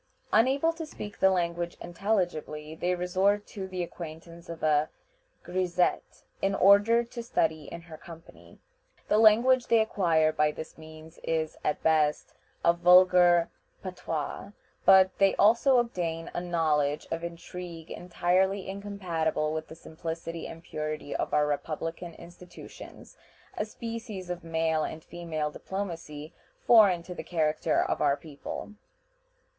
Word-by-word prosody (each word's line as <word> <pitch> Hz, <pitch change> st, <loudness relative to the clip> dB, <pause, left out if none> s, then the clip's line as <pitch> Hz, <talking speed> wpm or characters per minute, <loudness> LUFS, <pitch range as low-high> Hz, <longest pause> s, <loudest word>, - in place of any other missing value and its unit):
Unable 270 Hz, +9 st, +3 dB
to 325 Hz, -1 st, -6 dB
speak 210 Hz, -8 st, -9 dB
the 190 Hz, -, +5 dB
language 175 Hz, -1 st, -1 dB
intelligibly, 175 Hz, -5 st, -2 dB
they 180 Hz, +3 st, -1 dB
resort 190 Hz, +3 st, +1 dB
to 195 Hz, -3 st, -7 dB
the 185 Hz, -1 st, -3 dB
acquaintance 170 Hz, 0 st, -10 dB
of 165 Hz, -1 st, -8 dB
a 155 Hz, 0 st, +2 dB, 0.5 s
grisette, 180 Hz, -1 st, -1 dB, 0.2 s
in 195 Hz, 0 st, +1 dB
order 205 Hz, +5 st, +5 dB
to 235 Hz, 0 st, -8 dB
study 160 Hz, -9 st, -1 dB
in 170 Hz, +4 st, -8 dB
her 165 Hz, -1 st, -12 dB
company. 165 Hz, -1 st, -14 dB, 0.5 s
The 210 Hz, -, +4 dB
language 240 Hz, +4 st, +5 dB
they 230 Hz, -, +4 dB
acquire 165 Hz, -7 st, +2 dB
by 150 Hz, 0 st, +1 dB
this 160 Hz, -, -8 dB
means 160 Hz, +1 st, -13 dB
is, 160 Hz, -1 st, -1 dB
at 150 Hz, -, -1 dB
best, 155 Hz, -2 st, +1 dB, 0.3 s
a 170 Hz, -, +6 dB
vulgar 175 Hz, -1 st, +5 dB, 0.3 s
patois; 180 Hz, +1 st, -5 dB, 0.3 s
but 190 Hz, 0 st, +6 dB
they 195 Hz, 0 st, +4 dB
also 235 Hz, +5 st, +4 dB
obtain 170 Hz, -9 st, -2 dB
a -, -, -2 dB
knowledge 155 Hz, -4 st, 0 dB
of 165 Hz, +1 st, -3 dB
intrigue 170 Hz, -1 st, -8 dB
entirely 185 Hz, +2 st, 0 dB
incompatible 180 Hz, -6 st, -2 dB
with 160 Hz, 0 st, -4 dB
the 160 Hz, -, -11 dB
simplicity 165 Hz, 0 st, -6 dB
and 165 Hz, 0 st, -10 dB
purity 155 Hz, -2 st, -5 dB
of -, -, -2 dB
our 150 Hz, 0 st, +3 dB
republican 165 Hz, +3 st, -4 dB
institutions 175 Hz, +1 st, -13 dB, 0.4 s
a 210 Hz, -, -2 dB
species 220 Hz, -4 st, -7 dB
of 175 Hz, -1 st, -6 dB
male 160 Hz, -1 st, 0 dB
and 160 Hz, +1 st, -6 dB
female 160 Hz, -3 st, -4 dB
diplomacy 165 Hz, -5 st, -6 dB, 0.3 s
foreign 200 Hz, -7 st, +6 dB
to 180 Hz, -, -8 dB
the -, -, -7 dB
character 155 Hz, -1 st, 0 dB
of -, -, -2 dB
our 145 Hz, -1 st, +3 dB
people. 150 Hz, +7 st, -8 dB
170 Hz, 135 wpm, -28 LUFS, 160-195 Hz, 0.5 s, a